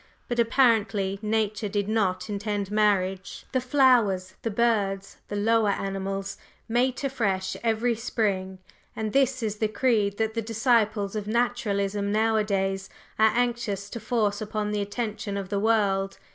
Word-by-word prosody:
But 240 -1 -2
apparently 220 -5 +2
Nature 215 -1 -1
did 200 0 -1
not 190 -4 0
intend 205 -1 -3
marriage. 195 -3 0
The 260 - +1
flowers, 240 -9 +3
the 230 - -2
birds, 205 -3 0
the 205 - -5
lower 220 +1 +2
animals, 195 0 -3 0.3
mate 250 +4 0
afresh 200 -9 -1
every 230 +1 +1
spring, 200 -5 -2 0.4
and 215 -1 -3
this 265 -2 +2
is 215 -1 -2
the 215 - +1
creed 210 -3 +1
that 220 0 0
the 230 - -1
disciples 220 -2 +1
of 210 -1 -3
Naturalism 210 -4 0
nowadays 205 -3 0 0.3
are 220 0 +6
anxious 235 -5 -1
to 235 - -5
force 215 -2 0
upon 210 0 -2
the 210 -1 -1
attention 210 -1 -3
of 195 -2 -5
the 200 0 0
world. 200 -3 +1
210 Hz, 145 wpm, -26 LUFS, 200-230 Hz, 0.4 s, are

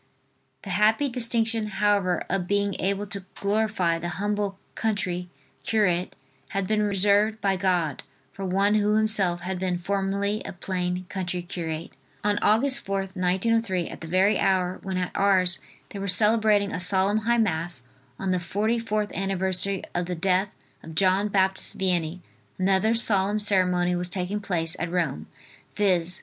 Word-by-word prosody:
The 195 - -6
happy 220 +8 +3
distinction, 230 -2 +1
however, 200 -3 +2
of 180 -2 -2
being 200 0 0
able 200 +2 -1
to 200 -1 -6
glorify 200 -5 0
the 175 +1 -4
humble 205 -1 -1 0.2
country 180 -5 -2 0.3
curate 185 -5 +1 0.3
had 195 -1 -2
been 215 +2 +1
reserved 205 +2 +3
by 195 -2 +1
God 180 -6 0 0.3
for 195 - -8
one 195 +2 +2
who 210 0 +2
himself 210 -5 +2
had 185 0 -4
been 180 -1 -1
formerly 200 +3 -1
a - - -7
plain 180 0 -3
country 180 -2 -4
curate. 165 -2 -5 0.3
On 205 0 +1
Aug. 215 +2 +3
4th, 195 -8 0
1903, 190 +1 0
at - - -9
the 165 - -7
very 190 +4 +3
hour, 185 -1 +1
when 190 -1 -3
at 180 -1 -3
Ars 185 -3 +2 0.3
they 200 - -7
were 200 - -3
celebrating 210 +1 +4
a - - -2
solemn 190 +3 +2
High 235 +2 +1
Mass 170 - -1 0.3
on 190 -1 -2
the 180 - +1
forty 210 +6 -1
fourth 215 -2 -2
anniversary 190 0 -1
of 175 0 -2
the 180 - -3
death 185 +3 +1 0.3
of 160 -1 -10
John 190 +3 +3
Baptist 190 -1 +1
Vianney, 180 -2 -1 0.4
another 195 +4 +2
solemn 205 -3 +3
ceremony 180 -3 +2
was 175 0 -2
taking 185 +3 -2
place 170 -5 -2
at 165 - -2
Rome, 165 - -2 0.5
viz. 180 -3 +1
195 Hz, 155 wpm, -25 LUFS, 180-205 Hz, 0.5 s, celebrating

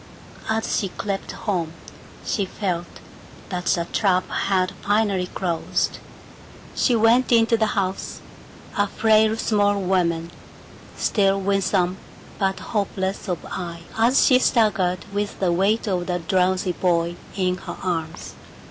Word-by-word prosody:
As 220 0 0
she 195 - -2
crept 200 +1 -4
home 175 -6 -2 0.5
she 205 -6 0
felt 180 -3 -3 0.6
that 180 -1 -4
the 170 - +1
trap 185 -3 +2
had 185 -2 +1
finally 205 -3 +1
closed. 175 -3 -1 0.7
She 245 - +2
went 230 +3 +4
into 230 0 +5
the 220 -1 +2
house, 190 -1 -2 0.6
a 205 0 +2
frail 220 +1 +3
small 205 -2 +2
woman, 170 -3 0 0.7
still 195 -2 +2
winsome 190 -2 +1 0.4
but 195 -1 0
hopeless 195 -1 -2
of 175 - -3
eye 170 -2 -6
as 235 +4 +4
she 255 -1 +6
staggered 195 -8 +2
with 205 0 -2
the 185 -3 +2
weight 200 +6 +1
of 180 -3 -1
the 180 -1 0
drowsy 185 +2 +1
boy 170 -1 0 0.2
in 185 -2 0
her - - -8
arms. 165 -3 -3
190 Hz, 130 wpm, -23 LUFS, 180-210 Hz, 0.7 s, she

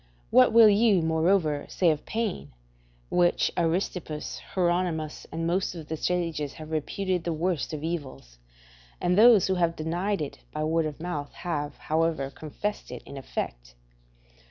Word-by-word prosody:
What 130 - +6
will 225 0 +8
you, 205 -3 +4
moreover, 160 -2 +1
say 175 -3 +3
of 150 -1 -4
pain, 210 - -3 0.6
which 175 -1 +2
Aristippus, 165 -2 -2
Hieronimus, 175 -4 0
and 165 0 -3
most 180 +2 0
of 160 -3 -9
the 160 - -1
sages 165 -4 -1
have 155 0 -10
reputed 180 +3 -1
the 170 - -1
worst 170 0 -1
of 155 -1 -5
evils; 135 - -5 0.6
and 180 0 +1
those 220 -2 +7
who 190 - +1
have 170 -2 +1
denied 175 +6 -1
it 145 - -7
by 155 - -3
word 160 0 +1
of 150 -1 -7
mouth 155 -4 -4
have, 150 -5 -3
however, 160 -3 0
confessed 180 +9 -5
it - - -8
in 140 - -10
effect? - - -5
165 Hz, 155 wpm, -27 LUFS, 150-180 Hz, 0.6 s, will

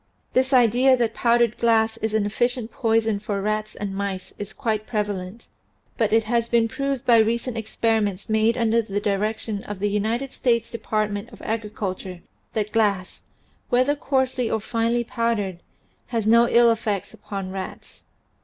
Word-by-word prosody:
This 260 +1 +2
idea 255 +1 +5
that 230 -2 0
powdered 235 -1 +2
glass 225 -1 +3
is 220 -1 -2
an 215 -2 +2
efficient 240 +2 -1
poison 225 -3 +1
for 205 -1 -3
rats 215 +1 -2
and 200 -1 -4
mice 195 -2 -4
is 205 0 -6
quite 215 -4 -2
prevalent, 205 -1 -3 0.5
but 225 -3 +1
it 225 +1 +4
has 235 +1 0
been 230 -1 +3
proved 275 +2 -3
by 235 -2 +6
recent 230 +2 +1
experiments 220 -3 -1
made 220 +1 +2
under 230 -1 +3
the 205 -2 -3
direction 205 +1 -2
of 205 - -5
the 205 +2 0
United 225 +6 -1
States 235 -2 0
Department 215 -1 -2
of 220 - -13
Agriculture 200 -4 -4 0.3
that 210 -1 -1
glass, 200 -5 0 0.5
whether 255 +4 +3
coarsely 260 -4 0
or 220 - 0
finely 230 +2 0
powdered, 225 -6 -1 0.5
has 230 -4 -2
no 235 +2 +5
ill 235 0 +6
effects 215 -3 -2
upon 195 -3 -6
rats. 190 -1 -8
220 Hz, 155 wpm, -23 LUFS, 205-235 Hz, 0.5 s, by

